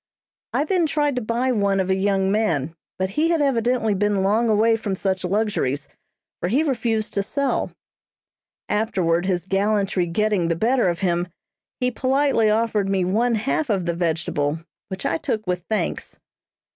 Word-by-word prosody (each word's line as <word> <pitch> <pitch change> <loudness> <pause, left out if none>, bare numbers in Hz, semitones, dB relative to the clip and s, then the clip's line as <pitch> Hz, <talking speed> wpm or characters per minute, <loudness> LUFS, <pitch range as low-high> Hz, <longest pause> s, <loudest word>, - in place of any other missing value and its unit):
I - - +1
then 345 +1 +1
tried 295 -3 0
to - - 0
buy 235 +3 0
one 200 -4 +1
of 190 0 0
a - - +3
young 195 0 +1
man, 165 -9 0 0.2
but 190 0 -1
he 310 +10 +1
had 335 -1 +2
evidently 245 -5 +1
been 200 0 +1
long 220 +4 +2
away 220 +2 +4
from 210 -3 -3
such 190 0 -2
luxuries, 180 -8 -1 0.5
for 175 - -2
he 270 +9 +2
refused 230 -6 -1
to 200 - +1
sell; 280 +7 -1 1.0
afterward, 185 -5 0
his 180 -3 0
gallantry 195 -2 +1
getting 200 0 +1
the 165 - +1
better 235 +3 +2
of 170 +2 -3
him, 175 -1 0 0.5
he 250 0 +1
politely 265 -3 +2
offered 215 -2 +1
me 190 -2 +1
one 230 +6 +1
half 265 +6 -1
of 195 -5 0
the 170 - 0
vegetable, 160 -3 -1 0.3
which 190 0 -6
I 165 - 0
took 215 -1 -2
with 180 -1 -2
thanks. 220 - -2
205 Hz, 170 wpm, -22 LUFS, 185-230 Hz, 1.0 s, away